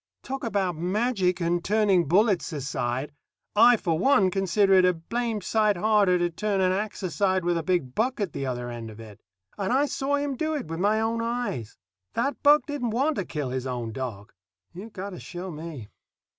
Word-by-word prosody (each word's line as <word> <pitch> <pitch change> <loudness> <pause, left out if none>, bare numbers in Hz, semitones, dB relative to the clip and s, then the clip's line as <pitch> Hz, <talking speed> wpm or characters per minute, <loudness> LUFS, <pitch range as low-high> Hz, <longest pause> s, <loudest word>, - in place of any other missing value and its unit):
Talk 270 0 -5
about 195 -6 -1
magic 185 +1 0
and 170 0 0
turning 200 -5 +2
bullets 195 +2 +2
aside 135 -2 -3 0.4
I, 235 +3 +7
for 165 -6 -1
one, 195 -5 +4
consider 195 +1 +2
it 185 -1 +6
a 180 0 +4
blamed 225 +5 -3
sight 215 -2 +2
harder 205 -2 +3
to 175 0 0
turn 205 +3 -1
an 185 -1 +3
ax 205 +2 -3
aside 185 0 0
with 175 0 +2
a 165 - 0
big 165 -7 -1
buck 250 - 0
at 195 -7 -2
the - - -4
other 120 -1 -4
end 115 -1 -7
of 110 0 -12
it. 110 -3 -12 0.4
And 195 +1 -1
I 270 +3 +3
saw 280 0 -1
him 285 -1 -2
do 315 +3 -1
it 290 - -3
with 165 +1 -5
my 210 +3 +2
own 225 +1 0
eyes. 230 - -3 0.4
That 275 +5 -1
buck 295 +1 +5
didn't 290 -6 -3
want 275 +7 +1
to 195 - -2
kill 145 -5 -4
his 130 0 -3
own 120 -3 -3
dog. 110 -5 -6 0.4
You've 205 +6 -9
got 200 +1 -6
to 180 - -8
show 180 +1 -7
me. 155 -8 -8
190 Hz, 200 wpm, -26 LUFS, 165-225 Hz, 0.4 s, I